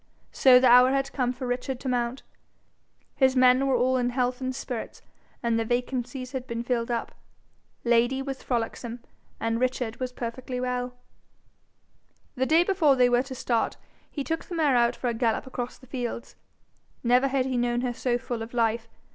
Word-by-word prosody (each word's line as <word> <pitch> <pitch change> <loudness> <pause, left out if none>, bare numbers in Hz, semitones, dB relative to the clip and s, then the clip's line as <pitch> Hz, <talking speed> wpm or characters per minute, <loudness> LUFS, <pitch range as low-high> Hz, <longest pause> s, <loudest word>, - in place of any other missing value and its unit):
So 255 -2 +6
the 255 - +2
hour 250 +1 +7
had 275 0 -1
come 250 -3 0
for 255 +1 -6
Richard 250 +1 -3
to 275 - -5
mount. 245 0 -1 0.9
His 265 -1 +3
men 255 +1 +5
were 265 - +2
all 255 +1 +2
in 245 -1 +1
health 250 +1 -1
and 260 0 -2
spirits, 245 -3 -6 0.4
and 230 -1 +1
their 225 - -1
vacancies 250 +1 -2
had 260 -2 -5
been 235 0 -3
filled 240 -1 -1
up. 235 -1 -2 0.7
Lady 240 +2 +3
was 270 -1 -5
frolicsome, 235 0 -3 0.4
and 225 0 -1
Richard 250 -2 -1
was 255 -1 -3
perfectly 250 +1 -5
well. 250 0 -2 1.4
The 260 -1 -1
day 325 +2 +5
before 350 -7 +3
they 250 -1 +4
were 245 0 +3
to 265 0 -7
start 240 -2 -1 0.3
he 285 - -4
took 325 +3 -2
the 350 - -6
mare 300 -5 +3
out 235 -1 +3
for 250 - -4
a 240 - +1
gallop 225 -1 0
across 250 -2 -5
the 260 - -17
fields. 240 -2 -5 0.7
Never 250 +3 +4
had 265 -1 0
he 260 -1 -2
known 240 0 +1
her 250 -1 -1
so 240 0 0
full 245 -2 -5
of 225 +2 -7
life. 230 -1 +1
250 Hz, 185 wpm, -26 LUFS, 240-260 Hz, 1.4 s, hour